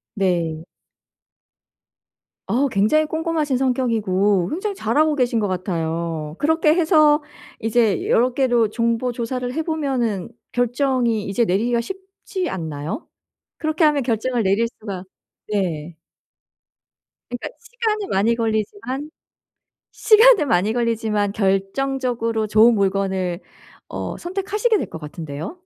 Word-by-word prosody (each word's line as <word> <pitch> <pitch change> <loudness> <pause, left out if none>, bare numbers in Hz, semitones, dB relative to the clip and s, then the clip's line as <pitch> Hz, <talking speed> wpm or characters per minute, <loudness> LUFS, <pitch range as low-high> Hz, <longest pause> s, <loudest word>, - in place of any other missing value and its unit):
네. 170 -5 0 1.8
아, 270 +5 +1
굉장히 220 +11 +3
꼼꼼하신 315 -4 -1
성격이고 210 -8 +1
굉장히 395 +5 -3
잘하고 305 - +1
계신 245 -4 +1
것 210 - +1
같아요. 165 -4 -3
그렇게 315 0 +3
해서 310 -3 +4 0.4
이제 225 -4 +1
여러 245 +2 +3
개로 240 -5 +2
정보 235 +2 0
조사를 245 +1 -3
해 320 +3 -1
보면은 265 - -1 0.2
결정이 245 -3 0
이제 230 +4 +1
내리기가 235 +5 +1
쉽지 380 - -6
않나요? 160 - -5 0.5
그렇게 315 +1 +1
하면 295 -3 +3
결정을 235 0 0
내릴 200 +4 +2
수가 195 -4 -6 0.4
네. 170 -6 -2 1.3
그러니까 245 - -4
시간이 455 -3 -2
많이 215 +5 +2
걸리지만 245 - -2 0.8
시간은 440 - +5
많이 215 0 +2
걸리지만 220 -4 0
결정적으로 225 +3 0
좋은 220 +2 +5
물건을 190 -2 0 0.5
어 - - -5
선택하시게 405 +5 0
될 - - -4
것 160 - -8
같은데요. 150 - -6
235 Hz, 270 characters per minute, -21 LUFS, 195-295 Hz, 1.8 s, 시간은